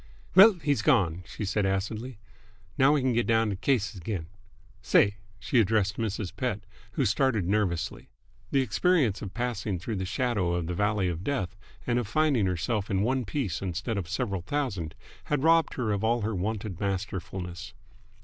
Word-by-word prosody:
"Well, 205 +3 +9
he's 145 -6 0
gone!" 90 - +2
she 105 - -5
said 100 +1 0
acidly. 105 +5 -2 0.6
"Now 140 +1 +5
we 150 - +2
can 130 -1 +1
get 120 0 +1
down 115 -2 +3
t' - - -2
cases 110 -1 0
again. 85 -2 -3 0.6
Say!" 100 +1 +3 0.2
She 125 - +1
addressed 105 -1 +2
Mrs. 105 -4 -3
Pett, 120 -6 -2 0.3
who 135 - +1
started 110 -2 +2
nervously. 95 -4 -1 0.4
The 135 - +2
experience 125 - +2
of 100 -2 -7
passing 115 -5 -2
through 100 +5 -4
the 95 - -2
shadow 100 -5 0
of 85 -2 -1
the 90 - -3
valley 105 +1 +1
of 85 0 -3
death 95 -8 -2 0.3
and 120 0 +1
of 120 - -3
finding 140 -6 +2
herself 95 +4 -1
in 100 -1 +1
one 130 +2 0
piece 100 - -2
instead 100 +5 -3
of 90 -3 -6
several 105 -4 -2
thousand 95 - -3 0.3
had 145 -2 -1
robbed 165 0 +4
her 115 -5 -1
of 100 0 -1
all 115 +1 +2
her 110 +2 -1
wonted 100 -1 -3
masterfulness. 95 -2 -4
105 Hz, 175 wpm, -28 LUFS, 95-125 Hz, 0.6 s, Well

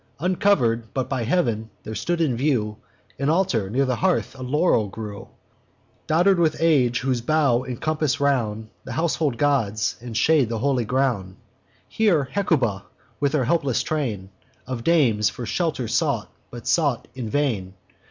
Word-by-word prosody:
Uncover'd 145 - +1
but 130 -2 -1
by 130 -3 -2
heav'n, 115 -6 0
there 110 - -6
stood 115 +11 -2
in 140 -7 +1
view 115 -5 0 0.4
An 140 +1 0
altar; 155 - +1
near 135 +6 +1
the 125 -2 -1
hearth 185 -1 0
a 130 - -11
laurel 130 - +2
grew, 105 0 -8 0.8
Dodder'd 175 +4 +3
with 160 -2 +2
age, 140 -7 +3
whose 130 -2 0
boughs 135 -2 +2
encompass 150 +3 -1
round 110 -6 0
The - - -7
household 160 -5 0
gods, 115 -8 +1
and 120 -2 -5
shade 150 -7 +3
the 115 - -2
holy 130 0 0
ground. 115 -7 -1 0.5
Here 200 -10 +2
Hecuba, 130 - 0 0.3
with 140 0 +1
all 145 - +2
her - - 0
helpless 140 -4 +1
train 110 -11 -3 0.3
Of 125 -2 -5
dames, 125 -11 +3
for 120 - -7
shelter 130 - -1
sought, - - 0 0.2
but 120 -1 -10
sought 145 -8 +1
in 125 -4 -5
vain. 110 -10 -1
130 Hz, 155 wpm, -23 LUFS, 115-155 Hz, 0.8 s, Dodder'd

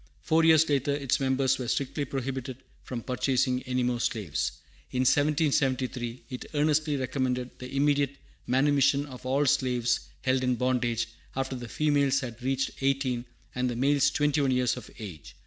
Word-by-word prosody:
Four 160 +1 +3
years 160 -1 +7
after, 140 -1 +1
its 140 -3 0
members 130 0 +1
were 125 - -3
strictly 140 +3 -1
prohibited 130 -1 -4 0.3
from 120 -3 -5
purchasing 130 0 +1
any 125 0 0
more 120 -1 0
slaves. 95 - -1 0.4
In 125 - -1
1773 130 -4 +1
it 125 - -7
earnestly 150 0 +2
recommended 130 -1 -1
the 125 0 -8
immediate 140 -1 +2 0.3
manumission 140 +2 +3
of 130 -2 -9
all 140 +3 +2
slaves 125 -3 +2 0.2
held 130 0 +2
in 125 -1 +2
bondage, 120 -2 0 0.3
after 135 0 -2
the 120 -1 -6
females 140 -2 +2
had 120 -2 -7
reached 135 +2 -2
eighteen 135 -3 0 0.3
and 125 0 0
the 120 - -3
males 140 +2 +3
twenty 145 0 +1
one 140 - +2
years 125 -1 +2
of - - -9
age. 80 - -9
130 Hz, 160 wpm, -28 LUFS, 125-140 Hz, 0.4 s, years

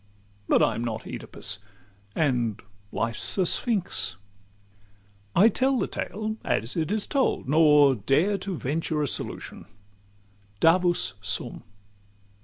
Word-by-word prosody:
But - - +4
I'm 115 0 0
not 110 -2 -4
Oedipus, 100 0 -4 0.6
and 125 -8 0 0.3
life's 115 - -1
a 190 - +3
Sphinx. 100 - +2
XIII - - -29 1.2
I 200 +5 +7
tell 260 +4 +1
the - - 0
tale 215 +1 -4
as 115 +4 -1
it 165 +1 -1
is 215 -1 0
told, 270 - 0
nor 150 -2 +5
dare 145 - +1
To 190 -2 -4
venture 150 +2 -2
a - - 0
solution: 115 - -4 0.9
"Davus 175 - +3
sum!" 105 +5 -4
150 Hz, 120 wpm, -26 LUFS, 115-190 Hz, 1.2 s, I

